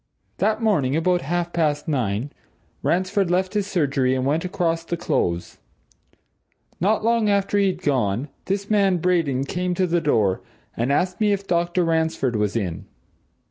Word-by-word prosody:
That 220 +1 0
morning, 150 - +2
about 175 +2 +2
half 175 +3 -2
past 150 -3 0
nine, 125 -3 -1 0.5
Ransford 185 +1 +1
left 185 +2 0
his 205 -2 0
surgery 140 -7 +1
and 130 0 -1
went 150 +4 +1
across 165 -2 -1
the 170 +1 -3
Close. 85 - -1 1.2
Not 210 +5 +1
long 230 -2 +2
after 200 0 +2
he'd 190 -2 0
gone, 125 -2 0 0.2
this 195 +1 -2
man 200 -3 +3
Braden 165 -7 +1
came 180 +5 -2
to 185 - +2
the 175 -1 +1
door, 110 - +1 0.3
and 120 +4 0
asked 180 +7 0
me 210 -1 +4
if 200 0 -3
Dr. 175 0 +1
Ransford 160 -6 0
was 105 0 0
in? 95 -7 -3
170 Hz, 155 wpm, -23 LUFS, 135-190 Hz, 1.2 s, me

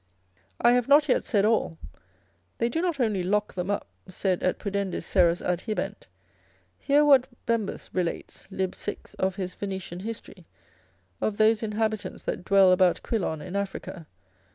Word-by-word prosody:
I 240 - +5
have 245 -1 +2
not 290 +2 +6
yet 255 - +2
said 205 -6 +2
all, 215 - +1 0.8
they 235 - +1
do 320 +7 -1
not 345 -5 -1
only 215 -6 +1
lock 205 +3 0
them 180 +1 -3
up, 205 - -1 0.2
sed 185 0 -1
et 185 - +1
pudendis 200 -2 -3
seras 175 -2 +3
adhibent: 215 - -3 0.7
hear 290 +1 +3
what 275 -3 +6 0.2
Bembus 230 -3 -2
relates 180 -2 -3
lib. 190 -1 -2
6. 205 - -6
of 190 -1 0
his 185 -2 -4
Venetian 190 -3 -5
history, 225 +3 -8 0.7
of 210 -1 -1
those 220 0 +4
inhabitants 215 -1 -2
that - - -3
dwell 195 -1 +5
about 185 -1 +3
Quilon 175 -9 -2
in 185 - -7
Africa. 195 -4 -4
200 Hz, 155 wpm, -26 LUFS, 185-230 Hz, 0.8 s, not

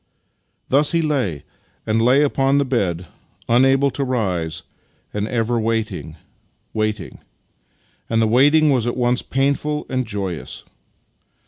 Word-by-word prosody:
Thus 145 +4 +3
he 165 - +3
lay 125 - -1 0.4
and 110 +1 +1
lay 130 +5 +4
upon 135 -1 +2
the 140 - +2
bed, 95 -9 -1 0.4
unable 135 +3 +4
to 140 +2 -2
rise, 90 - -1 0.5
and 105 0 -2
ever 115 0 0
waiting 110 -7 -2 0.3
— - - -43
waiting: 110 -5 -3 0.9
and 115 - +1
the 115 - +3
waiting 145 +7 +4
was 125 -3 +1
at 120 - -2
once 125 0 +1
painful 140 +2 -1
and 130 -1 -1
joyous. 95 -5 -5
120 Hz, 130 wpm, -20 LUFS, 105-135 Hz, 0.9 s, lay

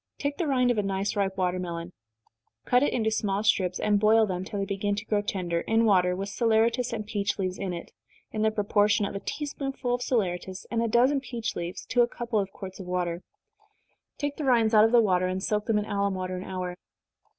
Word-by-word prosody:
_ - - -58
Take 285 0 -2
the 340 - -1
rind 250 -3 +3
of 230 - 0
a - - +3
nice 195 0 -2
ripe 195 -2 -1
watermelon 180 -2 -2 0.7
cut 250 0 +4
it 290 - +2
into 220 -2 0
small 205 -2 0
strips, 185 -4 +2
and 205 -1 +2
boil 220 +1 +5
them, 185 -2 -3
till 205 +2 -6
they 200 - -1
begin 200 +1 -1
to 210 +1 -5
grow 210 -1 +1
tender, 175 -4 -2
in 225 +1 +2
water, 180 -4 +3
with 195 +2 -4
saleratus 230 +3 +2
and 215 -2 -4
peach 205 -1 -2
leaves 185 -2 -2
in 195 -2 -2
it, 170 -1 -7 0.4
in 215 - -3
the 220 - +4
proportion 210 -1 +2
of - - -4
a 200 - -3
tea 295 - -4
spoonful 270 -3 -3
of 245 - -1
saleratus 190 -6 -2
and 230 -1 +1
a 230 - +1
dozen 250 +5 +3
peach 235 -4 -4
leaves 170 +1 -5
to 245 - +2
a 240 - +4
couple 235 -2 -2
of 195 -1 -2
quarts 190 -2 -9
of 185 - -8
water. 175 -1 -2 1.0
Take 290 -1 -3
the 305 - -3
rinds 235 -4 +3
out 215 0 +7
of 225 - +2
the 240 -1 +6
water, 185 -4 +2
and 185 +1 -3
soak 210 0 -1
them 225 -2 +2
in 210 - 0
alum 200 -2 -1
water 185 0 -3
an 180 - -6
hour. 180 -1 -4
205 Hz, 235 wpm, -27 LUFS, 185-230 Hz, 1.0 s, out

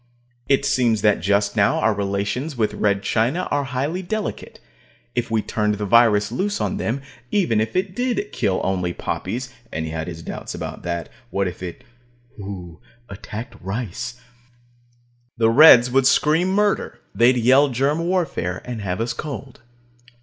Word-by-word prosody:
It 140 0 +3
seems 125 -6 +2
that 105 -1 +4
just 100 +3 +1
now 100 -1 +3
our 110 - +2
relations 100 +8 -2
with 110 -2 0
Red 100 -1 0
China 130 +11 0
are 145 -1 +1
highly 140 +7 -2
delicate. 215 +3 -4 0.5
If 120 -1 -2
we 110 -1 0
turned 105 -1 0
the 105 0 -3
virus 105 -1 +4
loose 205 +10 -1
on 205 - -1
them, 135 - -2 0.3
even 165 - +2
if 110 0 -3
it 185 0 -1
did 245 -4 -1
kill 95 -2 0
only 90 -2 -1
poppies 125 +7 -4 0.2
(and 80 0 -3
he 80 - -5
had 80 -1 -4
his 85 -2 -7
doubts - - -6
about - - -6
that. 85 -2 -4 0.2
What 100 -1 0
if 90 - -6
shudder 90 -2 -8 0.5
it 95 -6 -8 0.3
attacked 105 +4 -8
rice?) 120 +4 -5 1.2
the 115 -1 +3
Reds 125 -2 +8
would 135 0 +4
scream 155 +5 +3
murder. 205 +1 0
They'd 125 +2 +4
yell 130 +5 +5
germ 135 +5 0
warfare, 165 - -1
and 120 -3 -5
have 95 +1 -2
us 115 - -1
cold. 140 -3 -7
120 Hz, 160 wpm, -22 LUFS, 100-145 Hz, 1.2 s, Reds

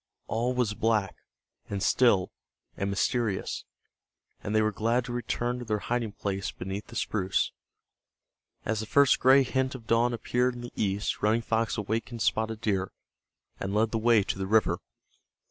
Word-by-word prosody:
All 120 +3 -1
was 120 -4 +1
black, 105 -3 +1 0.5
and 100 -1 -2
still, 110 -6 +3 0.4
and 100 - -2
mysterious, 105 +1 -1 0.8
and 105 - -2
they 110 - +5
were 110 - +2
glad 115 +4 0
to 125 - -5
return 120 +1 -2
to 120 - -6
their 105 -1 0
hiding 115 0 -2
place 95 -2 -3
beneath 95 +3 -6
the 120 - -12
spruce. 95 -4 0 1.1
As 110 -1 0
the 110 - -4
first 140 +1 +4
gray 135 +2 +6
hint 130 +1 -1
of 120 -3 -10
dawn 115 +2 +3
appeared 125 +2 0
in 120 - -7
the 120 - -8
east 100 0 -1
Running 110 +2 +2
Fox 115 +1 0
awakened 115 +2 -2
Spotted 110 0 0
Deer, 95 -4 0 0.7
and 95 +1 -3
led 110 +1 +2
the 115 - 0
way 115 -2 +4
to 95 - -3
the 95 - -2
river. 105 -5 +3
110 Hz, 165 wpm, -28 LUFS, 105-120 Hz, 1.1 s, gray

